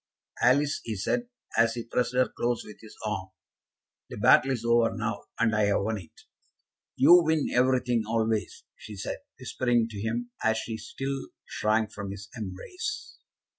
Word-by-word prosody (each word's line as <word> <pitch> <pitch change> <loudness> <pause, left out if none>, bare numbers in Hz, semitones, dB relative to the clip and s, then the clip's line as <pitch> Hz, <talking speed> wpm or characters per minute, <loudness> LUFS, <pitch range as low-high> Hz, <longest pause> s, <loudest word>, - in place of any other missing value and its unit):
"Alice," 140 +4 +3
he 110 - -3
said, 240 - -1 0.3
as 115 0 +3
he 120 - -4
pressed 125 +1 -1
her 130 0 +4
close 120 0 -2
with 105 - -11
his 110 - -13
arm, 95 -3 -3 0.8
"the - - -7
battle 135 - +6
is 120 -3 -2
over 115 -1 +3
now, 105 -1 -3
and 115 -2 +2
I 105 0 +3
have 100 -1 +2
won 110 +1 -1
it." 80 - -17 0.7
"You 175 +7 +8
win 160 -2 +1
everything, 125 -2 +3
always," 110 -1 -1
she 110 - -10
said, 95 - -4 0.2
whispering 120 -3 +1
to 105 -3 -6
him, 120 +2 -2
as 110 0 +3
she 110 0 -4
still 135 +5 -4 0.2
shrank 110 0 0
from 100 -1 -6
his 100 +1 -8
embrace. 365 - -6
115 Hz, 165 wpm, -28 LUFS, 110-125 Hz, 0.8 s, You